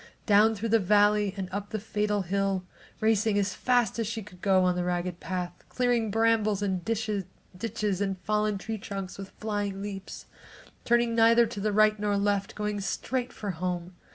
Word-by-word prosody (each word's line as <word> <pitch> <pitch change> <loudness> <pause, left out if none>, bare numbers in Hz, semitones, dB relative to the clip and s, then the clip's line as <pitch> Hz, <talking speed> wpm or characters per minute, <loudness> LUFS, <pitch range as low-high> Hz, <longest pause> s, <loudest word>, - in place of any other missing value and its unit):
Down 215 +1 +5
through 220 +2 -3
the 225 +1 +5
valley 205 0 +3
and 190 -1 -3
up 200 +1 -4
the 220 - -2
fatal 210 -1 -1
hill, 195 0 -1 0.4
racing 220 -1 +2
as 200 -1 +1
fast 245 -2 +1
as 225 - 0
she 225 0 -4
could 180 -2 -15
go 190 -2 +4
on 180 -1 +2
the 180 - -1
ragged 175 0 -2
path, 180 -1 -4
clearing 245 -3 +1
brambles 215 -2 +2
and 190 -3 -1
ditches 215 -2 -1 0.8
and 195 -1 -1
fallen 210 -1 0
tree 220 +2 -5
trunks 195 -1 -6
with 195 -1 -7
flying 205 -2 -3
leaps, 195 -2 -7 0.6
turning 235 0 +3
neither 230 +1 +6
to 205 - -6
the 210 +1 0
right 215 +1 +4
nor 210 0 0
the 200 - 0
left, 200 0 0
going 210 -1 -2
straight 245 +6 -2
for 205 -4 -4
home. 180 +1 -3
205 Hz, 180 wpm, -28 LUFS, 195-220 Hz, 0.8 s, neither